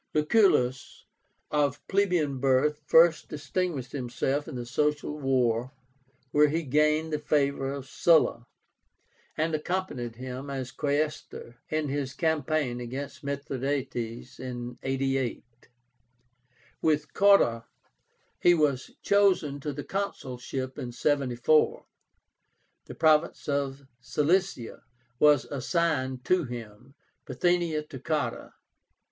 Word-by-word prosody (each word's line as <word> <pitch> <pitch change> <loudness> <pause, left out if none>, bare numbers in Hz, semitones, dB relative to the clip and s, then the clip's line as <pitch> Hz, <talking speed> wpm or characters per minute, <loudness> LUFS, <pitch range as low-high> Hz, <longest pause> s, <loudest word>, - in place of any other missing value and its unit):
Lucullus, 150 - +2 0.5
of 145 -2 0
plebeian 180 -9 +1
birth, 140 +3 +2
first 165 0 +5
distinguished 145 -2 -3
himself 135 +2 -2
in - - -7
the 120 -1 -5
Social 150 +3 -1
War, 130 -2 +1 0.6
where 150 0 +5
he 160 +3 -1
gained 150 +3 +2
the 150 - 0
favor 140 -2 0
of 140 -2 -6
Sulla, 150 -6 +3 0.9
and 160 +1 0
accompanied 155 -8 -3
him, 130 +3 -7
as 130 -2 -4
Quaestor, 145 -4 -3
in 155 -2 -1
his 135 -1 -3
campaign 155 -6 0
against 130 +5 -6
Mithradátes 135 -4 -4
in 125 -1 -6
88. 135 -2 -1 1.4
With 150 -1 +1
Cotta 195 -14 +4 0.7
he 175 - +5
was 145 -5 +1
chosen 185 -8 +3
to 145 +1 -4
the 145 +1 -6
consulship 130 -9 -4
in 120 - -5
74. 140 +2 +1 1.0
The - - -9
province 155 -1 +2
of 140 -1 -2
Cilicia 150 0 0 0.4
was 150 -2 +5
assigned 135 -3 -1
to 180 -3 +2
him, 120 +1 -9 0.3
Bithynia 165 +2 +1
to 140 -3 -10
Cotta. 150 +3 -3
140 Hz, 105 wpm, -28 LUFS, 130-155 Hz, 1.4 s, first